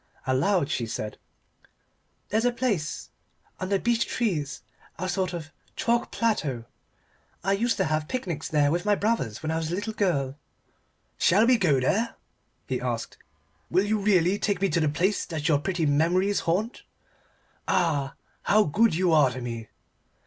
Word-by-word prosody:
Aloud 145 +4 +1
she 115 - -1
said 110 -2 -5 1.1
"There's 220 +2 +1
a 245 - +3
place 215 - -2 0.5
under 190 +1 0
beech 235 +3 +1
trees 155 - -2 0.3
a 185 - -3
sort 185 0 -1
of 160 -3 -6 0.2
chalk 235 0 +1
plateau 145 - -1 0.8
I 195 - +1
used 230 +4 +1
to 190 - +2
have 155 -1 -1
picnics 175 - -3
there 145 -2 +3
with 175 +2 0
my 210 0 +3
brothers 200 - -1
when 155 - -1
I 160 - 0
was 160 0 -3
a - - 0
little 205 +3 -3
girl 145 -10 0 0.4
" - - -44
"Shall 205 +6 +5
we 250 +1 +5
go 150 -8 +3
there?" 205 - 0 0.5
he - - -2
asked. - - -4 0.5
"Will 190 - +2
you 215 +1 +1
really 195 -1 +3
take 200 -4 0
me 195 0 +1
to 170 - +1
the 155 -2 +2
place 185 +8 +1
that 155 -2 -3
your 150 -4 +3
pretty 175 0 -1
memories 175 +7 +2
haunt? 200 +8 -1 0.9
Ah 145 -6 +1 0.3
how 215 +1 +4
good 210 +5 +2
you 180 -1 +2
are 150 -4 +5
to 125 +1 -6
me." 115 -2 -6
175 Hz, 165 wpm, -26 LUFS, 150-205 Hz, 1.1 s, Shall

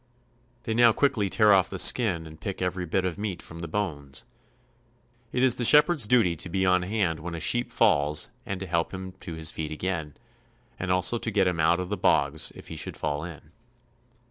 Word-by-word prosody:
They 110 - -2
now 115 0 +5
quickly 110 -8 +1
tear 105 +1 +4
off 95 -3 +3
the - - -5
skin 95 -10 +2
and 80 0 -13
pick 95 - -5
every 90 -1 -2
bit 95 +3 0
of 90 +1 -3
meat 100 -4 -4
from 85 - -10
the 85 - -5
bones. 75 -7 -3 1.1
It 125 - 0
is 130 -2 +5
the 125 - -1
shepherd's 150 -1 +5
duty 105 -8 +3
to 90 - -4
be 95 +2 0
on 90 0 +3
hand 90 -4 -1
when 85 +1 -6
a - - -5
sheep 120 +9 0
falls 75 +1 +2
and 100 -1 -5
to 95 - -5
help 85 +1 -2
him 95 0 -7
to 85 -2 -7
his 80 -1 -1
feet 80 -1 -5
again, 80 -2 -4 0.6
and 90 0 -2
also 90 +6 +1
to 115 - -3
get 100 -3 +2
him 90 -2 -1
out 85 +2 +3
of 90 -1 -4
the 105 - -2
bogs 70 +2 +1
if - - -12
he - - -7
should - - -5
fall 75 0 -3
in. 80 -2 -10
90 Hz, 215 wpm, -26 LUFS, 80-105 Hz, 1.1 s, now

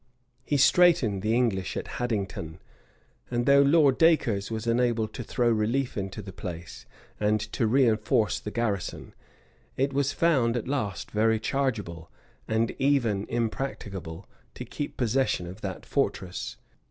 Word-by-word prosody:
He 145 - 0
straitened 140 - +4
the 110 +3 +1
English 110 -7 0
at - - -4
Haddington; 100 -9 -3 0.7
and 120 0 -1
though 140 0 +6
Lord 140 -2 +4
Dacres 120 -12 +3
was 110 0 -4
enabled 115 -2 +1
to 120 - -5
throw 120 +1 0
relief 120 +4 +1
into 100 +1 -4
the 95 -1 -9
place, 85 -1 -8 0.3
and 105 +1 +2
to 115 - +1
reenforce 110 -4 +2
the - - -6
garrison, 105 -5 -3 0.6
it 135 +1 0
was 140 0 +1
found 130 -8 +2
at 120 - -4
last 130 -8 -3
very 110 +1 +2
chargeable, 105 - -2 0.4
and 110 +1 +1
even 120 -7 +1
impracticable, 105 -7 -4 0.3
to - - -6
keep 145 - -6
possession 125 -6 +1
of 90 +5 -9
that 95 -3 -5
fortress. 90 -1 -2
115 Hz, 140 wpm, -27 LUFS, 100-135 Hz, 0.7 s, though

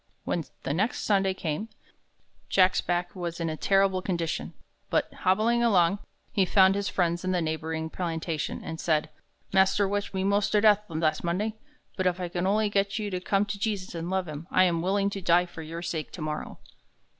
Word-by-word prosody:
When 165 -3 -2 0.2
the 135 - -1
next 200 +9 0
Sunday 195 -2 +2
came, 170 +6 -3 0.8
Jack's 185 -1 +4
back 175 +1 -2
was 175 -2 -4
in 165 -1 -1
a - - -3
terrible 195 +2 +2
condition. 170 -4 -3 0.3
But, - - 0
hobbling 230 -1 +2
along, 195 -4 +3 0.3
he 195 - +2
found 190 +1 +5
his 200 0 -1
friends 175 -1 0
in 185 0 0
the 180 - +2
neighboring 160 0 -3
plantation, 165 -3 -3
and 160 0 -6
said: 155 -2 0 0.4
"Mas'r 195 +1 +4
whipped 205 +1 -2
me 190 - 0
mos' 200 +1 +2
ter 210 - +3
death 210 -1 +5
last 155 -1 0
Monday, 190 +6 -1 0.4
but 185 -1 +1
if 180 0 0
I 180 -1 -3
can 175 +1 -1
only 210 +2 +2
get 200 0 0
you 210 -2 -3
to 185 - -2
come 195 +2 +1
to 200 0 -5
Jesus 200 -3 -2
and 170 0 -4
love 190 -1 -1
him, 155 +2 -7
I 185 - +4
am 170 -2 +2
willing 200 +2 +1
to 195 - -5
die 175 0 +4
for 175 -2 -10
your 165 +2 -6
sake 160 -3 -4
tomorrow." 155 -3 -5
185 Hz, 195 wpm, -27 LUFS, 165-200 Hz, 0.8 s, found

